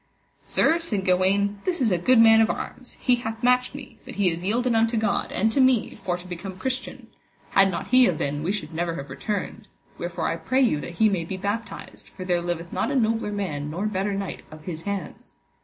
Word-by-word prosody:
Sir, 330 +2 +2
said 210 - -1
Gawaine, 195 +2 +2
this 360 -2 -1
is 230 -5 +2
a 180 - +3
good 255 +9 +4
man 225 0 +7
of 225 - +3
arms, 255 - -6
he 250 -1 +3
hath 225 0 -6
matched 250 +1 +3
me, 265 -5 -10
but - - -10
he 195 -3 +2
is 165 +1 -5
yielden 240 +5 +1
unto 225 +1 +2
God, 215 -2 0
and 220 +3 +1
to 270 - +2
me, 255 -4 +3
for 175 -2 -3
to 180 - -12
become 185 +1 -7
Christian; 260 +5 -4 0.5
had 195 0 +5
not 180 - -4
he 255 0 +7
have 175 -7 +1
been 145 +1 -2
we 170 +5 -1
should 195 -6 -4
never 170 0 -2
have 140 -3 -7
returned, 205 +9 -4 0.3
wherefore - - -2
I - - -1
pray 260 +1 +1
you 155 - +2
that 170 - -7
he 220 - +5
may 190 -5 0
be 185 +3 -5
baptised, 205 +4 -5
for 185 - -8
there 175 -2 +1
liveth 170 -1 -4
not - - 0
a 285 - -1
nobler 225 -3 +1
man 155 -8 -3
nor 175 +7 -3
better 200 -1 -1
knight 195 -2 -4
of 155 0 -12
his 165 -2 -6
hands. 195 -6 -6
200 Hz, 225 wpm, -25 LUFS, 175-230 Hz, 0.5 s, man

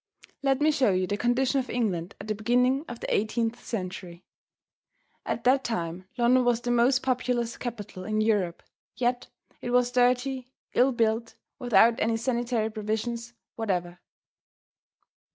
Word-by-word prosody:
Let 270 0 +1
me 310 +1 +5
show 275 -6 +2
you 185 -1 +1
the 200 - -2
condition 250 +4 +1
of 255 - -4
England 195 -7 -2
at - - -8
the 215 - 0
beginning 250 +6 +2
of 240 - -7
the - - -2
eighteenth 225 +2 -1
century. 185 -4 -6 1.0
At 230 - -2
that 265 +2 +4
time 180 -4 -3
London 250 +1 +4
was 240 -1 +2
the 245 - -1
most 245 +2 +3
populous 245 -2 0
capital 210 -6 -6
in 215 0 -1
Europe, 205 -6 +1 0.3
yet 245 0 -1 0.3
it - - -4
was 245 0 +3
dirty, 250 +1 +1 0.3
ill 260 +2 +4
built, 230 -1 0 0.2
without 235 -1 +4
any 225 +1 +1
sanitary 235 -2 -1
provisions 225 +2 -3 0.2
whatever. 180 -5 -2
235 Hz, 145 wpm, -27 LUFS, 215-250 Hz, 1.0 s, me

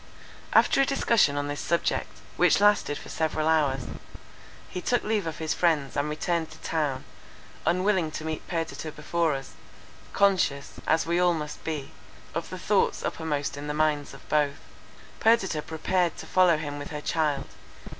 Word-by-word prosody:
After - - +5
a - - +4
discussion 230 - +3
on 145 0 -1
this 145 0 -4
subject, 170 +1 0 0.3
which - - +4
lasted 205 -8 +3
for - - -11
several 155 -1 -1
hours, 145 -4 +2 0.9
he 180 - -5
took 245 +6 +1
leave 210 -4 0
of 160 - -4
his 160 -1 -1
friends, 155 -6 +1
and 145 +1 0
returned 160 +1 -1
to 155 - -12
town, 150 -5 -2 0.6
unwilling 185 -1 +2
to 155 - -5
meet 160 -1 -4
Perdita 165 -2 -3
before 160 0 0
us, 135 0 -7 0.6
conscious, 185 -8 +1
as 160 +1 +3
we 170 +1 +1
all 180 -1 +4
must 150 -1 -6
be, 150 -4 -4 0.4
of - - -3
the - - -6
thoughts - - +1
uppermost 150 -3 -2
in 145 +1 -6
the 150 - -2
minds 150 -2 0
of - - -16
both. 145 -2 +1 0.6
Perdita 200 -9 +3
prepared 170 +3 0
to - - -7
follow 180 -3 +4
him 145 -2 -5
with 145 - -7
her 150 -1 -5
child. 150 -3 0
160 Hz, 165 wpm, -27 LUFS, 145-175 Hz, 0.9 s, After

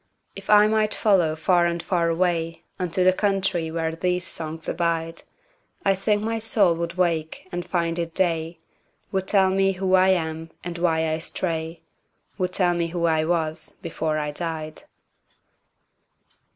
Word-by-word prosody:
If 195 -1 -11
I 210 0 +7
might 215 0 +1
follow 180 -7 +3
far 175 +2 +3
and 170 -1 -3
far 170 -3 +1
awayUnto 165 -1 0 0.5
the 185 0 +5
country 190 -4 0
where 160 0 -2
these 180 +1 -1
songs 160 -1 -4
abide,I 170 - -3
think 205 +2 0
my 225 +1 -1
soul 205 -6 +3
would 170 0 -4
wake 170 -1 -1
and 175 0 -3
find 170 -1 -1
it 165 -1 -4
day, 165 -2 0 0.5
Would 190 -2 -1
tell 190 -2 +4
me 195 0 +2
who 190 0 -1
I 185 0 +6
am, 160 -3 -1
and 175 -1 -5
why 160 -2 +1
I 160 0 -1
stray,—Would 165 +2 -5
tell 180 -1 +3
me 170 -1 -1
who 170 0 -2
I 160 -1 +2
was 160 -2 -1
before 160 -2 -2
I 150 -1 -2
died. 155 -1 -5
170 Hz, 150 wpm, -24 LUFS, 165-190 Hz, 0.5 s, I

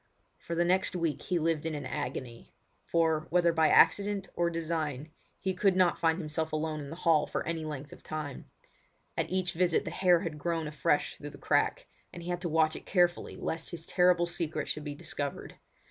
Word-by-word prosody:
For 170 - -5
the 175 +1 +2
next 185 +1 +2
week 165 -4 -1
he 180 - -1
lived 165 -2 0
in 160 -1 -2
an 145 -2 -5
agony; 125 -1 -5 0.3
for, 160 -1 +1
whether 170 -1 +3
by 160 -1 +4
accident 200 -1 +4
or 170 0 +2
design, 160 -3 -3 0.3
he 190 0 -1
could 190 +1 +2
not 185 -2 +3
find 165 -1 +2
himself 160 -1 -2
alone 155 0 -2
in 140 -1 -7
the 165 - -6
hall 165 -3 +3
for - - -3
any 160 -1 -3
length 145 -2 -6
of - - -14
time. 150 -3 -6 0.7
At - - -1
each 185 -1 0
visit 175 0 +2
the - - -4
hair 180 -3 +4
had 155 -3 -4
grown 165 0 -1
afresh 150 0 0
through 145 - -7
the - - -12
crack, - - +1 0.3
and 175 - -9
he 175 - -6
had 175 0 -2
to 175 - -2
watch 155 0 +3
it - - -9
carefully 175 -2 +2
lest 160 0 -3
his 165 -2 -5
terrible 180 -1 +4
secret 160 -3 -3
should 155 - -2
be 145 -1 -4
discovered. 145 -1 -4
165 Hz, 205 wpm, -30 LUFS, 155-175 Hz, 0.7 s, by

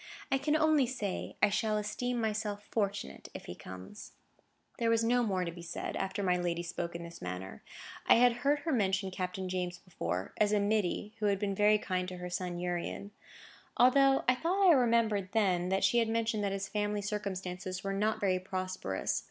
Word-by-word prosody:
I 270 - +3
can 295 +3 +1
only 310 -4 +4
say 215 -7 -4
I - - +7
shall 215 +1 +1
esteem 225 +4 -2
myself 210 -2 -2
fortunate 195 - -2
if - - -7
he - - -6
comes." 95 - -10 0.7
There 230 -1 +2
was 230 0 +3
no 245 +2 +3
more 190 -6 0
to 170 - -3
be 170 +1 -10
said, 170 0 -5
after 190 +1 -2
my 180 -1 +2
lady 175 -1 -1
spoke 170 0 -4
in 170 - -5
this 170 0 -10
manner. 90 -3 -6 0.5
I - - +8
had 240 0 +5
heard 285 +4 +1
her 320 - -2
mention 195 -5 +1
Captain 185 0 -3
James 180 -1 -2
before, 95 - -4
as 210 0 +3
a 210 - +4
middy 205 0 0
who 210 - +1
had 200 -1 +2
been 200 0 -1
very 210 +2 +4
kind 185 -3 -2
to 180 - -7
her 180 0 -6
son 180 -1 -3
Urian. 175 +3 -3 0.7
I 250 +1 +7
thought 275 +7 +3
I - - +9
remembered 230 -7 +2
then, 185 -5 +2
that 190 +1 +1
she 240 - +4
had 230 -1 +1
mentioned 225 -2 0
that 200 - 0
his 195 +1 -3
family 205 -1 -1
circumstances 190 -3 -4
were 195 0 -2
not 215 +2 0
very 190 -3 +1
prosperous. 185 - -2
200 Hz, 195 wpm, -32 LUFS, 180-225 Hz, 0.7 s, I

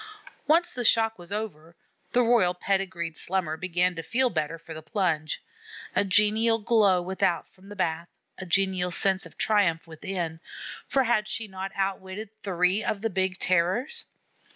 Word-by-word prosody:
Once 340 +3 +4
the 245 - -4
shock 225 -2 +3
was 175 +2 -9
over, 175 -6 -5 0.4
the 245 - +4
Royal 230 -7 +3
pedigreed 185 -3 -1
Slummer 175 -4 -1
began 180 +1 0
to 165 - -5
feel 245 +10 +1
better 160 -1 -2
for 165 0 -10
the 160 - -7
plunge. 160 -4 -1 0.5
A - - +4
genial 210 +4 +3
glow 205 -5 +3
without 185 -1 0
from 190 +2 -17
the 205 - -8
bath, 170 -3 -1 0.3
a 190 - -6
genial 185 0 +1
sense 190 +2 +2
of - - -20
triumph 195 -7 +2
within, 165 0 -4 0.5
for 270 - +3
had 225 -3 +1
she 225 0 -3
not 190 0 -6
outwitted 195 +2 -3
three 185 +2 +1
of 200 - -2
the 225 0 -1
big 190 0 0
Terrors? 190 - +1
190 Hz, 160 wpm, -27 LUFS, 175-215 Hz, 0.5 s, Once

